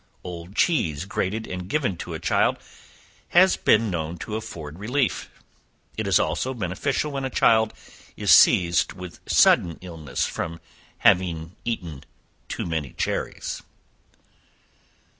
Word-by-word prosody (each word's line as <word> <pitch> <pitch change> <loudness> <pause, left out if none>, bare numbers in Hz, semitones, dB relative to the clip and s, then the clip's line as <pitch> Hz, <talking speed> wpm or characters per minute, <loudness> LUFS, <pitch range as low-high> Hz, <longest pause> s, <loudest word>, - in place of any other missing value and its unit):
Old 90 +1 -8
cheese 85 - +1
grated 105 +2 -2
and 90 0 -6
given 130 -10 0
to - - -6
a - - -5
child, - - +2 0.7
has 185 +2 +5
been 110 -1 +3
known 85 0 -3
to 105 +5 -5
afford 85 -8 -7
relief: 125 +5 -1 0.7
it 110 -2 -3
is 95 - +4
also 85 +12 -1
beneficial 120 - -2
when 135 -1 -3
a 135 - -1
child 110 -3 +3 0.5
is - - +2
seized 85 -2 +5
with 90 -1 -10
sudden 85 -2 +4
illness 80 -8 -3
from 85 0 -4 0.4
having 85 -1 +2
eaten 85 - -4 0.5
too - - -3
many 80 -5 -3
cherries. - - -3
90 Hz, 125 wpm, -24 LUFS, 85-110 Hz, 0.7 s, has